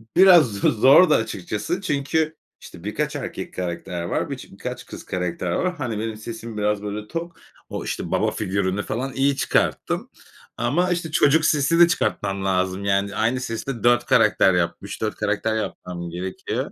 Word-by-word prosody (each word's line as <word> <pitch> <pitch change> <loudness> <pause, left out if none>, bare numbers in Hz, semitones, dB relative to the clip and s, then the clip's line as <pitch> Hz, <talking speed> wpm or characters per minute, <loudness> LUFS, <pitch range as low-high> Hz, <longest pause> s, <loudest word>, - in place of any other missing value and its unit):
biraz 175 - +7
z 100 - -6
zordu 135 +9 +6
açıkçası. 105 - -2
Çünkü 155 -1 0 0.3
işte - - -12
birkaç - - -2
erkek - - -5
karakter 90 -1 -4
var, 85 - -2
biç - - -7
birkaç - - -7
kız - - -10
karakter 90 -1 -3
var. 180 - 0
Hani, 120 -9 -3
benim 110 0 -3
sesim 115 0 -7
biraz 105 0 0
böyle 105 +1 -5
tok, 165 +2 -6 0.3
o, - - -4
işte, - - -4
baba - - +1
figürünü 100 -1 -1
falan 130 +4 -3
iyi 140 +1 +2
çıkarttım - - 0 0.5
ama 150 +11 +1
işte 170 -2 -2
çocuk 155 0 +4
sesi 155 +3 +3
de 175 - +9
çıkartmam 100 - -1
lazım. 95 +1 0
Yani 100 0 +1
aynı 115 +4 +1
sesi 115 -2 -5
de 120 -6 -4
4 120 0 +4
karakter 95 - +4
yapmış, 90 -1 -2
4 - - -1
karakter 110 0 -1
yapmam 90 -5 -5
gerekiyor. 90 +2 -4
110 Hz, 165 wpm, -23 LUFS, 95-145 Hz, 0.5 s, de